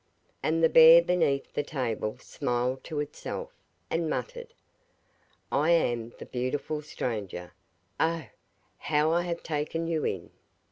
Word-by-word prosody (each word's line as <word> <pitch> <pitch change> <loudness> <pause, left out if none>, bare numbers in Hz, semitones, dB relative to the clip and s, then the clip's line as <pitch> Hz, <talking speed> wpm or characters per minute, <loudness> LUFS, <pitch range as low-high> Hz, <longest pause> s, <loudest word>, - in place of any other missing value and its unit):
And 165 +1 +1
the - - +8
bear 165 +1 +9
beneath 170 -6 +1
the - - 0
table 125 -6 -3
smiled 125 +1 -2
to 155 -3 -2
itself, - - -6 0.4
and 165 -1 -1
muttered: 485 - -5 1.0
'I 145 +4 +2
am 120 -9 +2
the - - -9
beautiful 135 +4 -3
stranger; 105 -11 -5 0.5
oh, 165 -2 +1 0.5
how 150 +1 +2
I 170 +1 +3
have 175 -1 -4
taken 160 +1 -2
you 165 -2 -1
in! 90 -3 -3
150 Hz, 130 wpm, -28 LUFS, 125-165 Hz, 1.0 s, bear